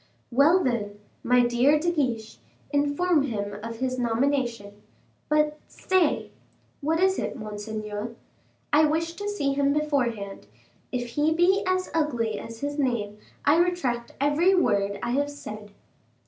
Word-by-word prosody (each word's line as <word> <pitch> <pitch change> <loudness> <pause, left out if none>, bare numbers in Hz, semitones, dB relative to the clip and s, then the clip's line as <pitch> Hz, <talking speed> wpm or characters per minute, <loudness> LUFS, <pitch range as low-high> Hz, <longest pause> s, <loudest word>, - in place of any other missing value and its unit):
"Well, 300 +9 +5
then, 205 -5 -2 0.2
my 245 0 +4
dear 245 +5 +4
De 345 +3 0
Guiche, 240 -9 -2 0.3
inform 290 +3 +2
him 205 -6 -3
of 230 +1 -6
his 255 +1 -2
nomination. 235 -4 -1 0.5
But, 300 0 +2
stay 370 -5 0 0.2
" - - -38
"What 320 +3 +1
is 380 +1 +3
it, - - -3
monseigneur?" 215 0 -5 0.6
"I 305 +1 +6
wish 325 +2 0
to 410 +4 -4
see 285 -10 0
him 280 0 +2
beforehand; 245 -10 -1 0.4
if 245 -1 -3
he 295 +6 +1
be 370 +4 +4
as 370 0 0
ugly 240 -10 0
as 230 0 -9
his 290 +1 -3
name, 215 -6 -1 0.3
I 290 +3 +5
retract 275 -10 0
every 305 +7 +3
word 200 - +1
I 240 - -1
have 285 +3 +1
said." 215 -7 -9
275 Hz, 145 wpm, -26 LUFS, 225-305 Hz, 0.6 s, I